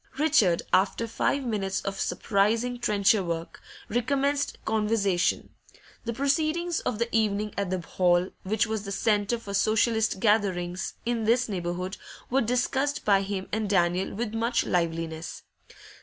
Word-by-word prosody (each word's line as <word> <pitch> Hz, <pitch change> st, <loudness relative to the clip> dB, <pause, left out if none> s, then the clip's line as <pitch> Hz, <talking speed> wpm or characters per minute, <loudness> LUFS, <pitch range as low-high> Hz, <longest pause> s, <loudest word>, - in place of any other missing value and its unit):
Richard, 275 Hz, -, +3 dB
after 200 Hz, +4 st, +2 dB
five 270 Hz, +4 st, 0 dB
minutes 195 Hz, -4 st, -1 dB
of 195 Hz, 0 st, -4 dB
surprising 225 Hz, +4 st, 0 dB
trencher 205 Hz, -2 st, +3 dB
work, 170 Hz, -1 st, -5 dB, 0.3 s
recommenced 280 Hz, +5 st, 0 dB
conversation. 210 Hz, -4 st, +1 dB, 0.6 s
The 235 Hz, -, -2 dB
proceedings 310 Hz, +6 st, 0 dB
of 220 Hz, -, -2 dB
the 235 Hz, +2 st, 0 dB
evening 210 Hz, -1 st, +1 dB
at 200 Hz, -2 st, -2 dB
the 185 Hz, -1 st, -1 dB
hall, 175 Hz, +1 st, +2 dB
which 215 Hz, +3 st, +1 dB
was 220 Hz, -1 st, -2 dB
the 200 Hz, -, -6 dB
centre 210 Hz, +2 st, +1 dB
for 205 Hz, -3 st, -8 dB
Socialist 220 Hz, +1 st, +2 dB
gatherings 190 Hz, -4 st, 0 dB
in 235 Hz, -2 st, -1 dB
this 240 Hz, +3 st, +3 dB
neighbourhood, 180 Hz, -1 st, -3 dB, 0.3 s
were 270 Hz, +2 st, +3 dB
discussed 265 Hz, +4 st, 0 dB
by 200 Hz, -2 st, +4 dB
him 195 Hz, -1 st, -4 dB
and 215 Hz, -1 st, -1 dB
Daniel 180 Hz, 0 st, +1 dB
with 225 Hz, 0 st, -3 dB
much 230 Hz, +2 st, 0 dB
liveliness. 165 Hz, -1 st, -2 dB
210 Hz, 140 wpm, -27 LUFS, 190-235 Hz, 0.6 s, by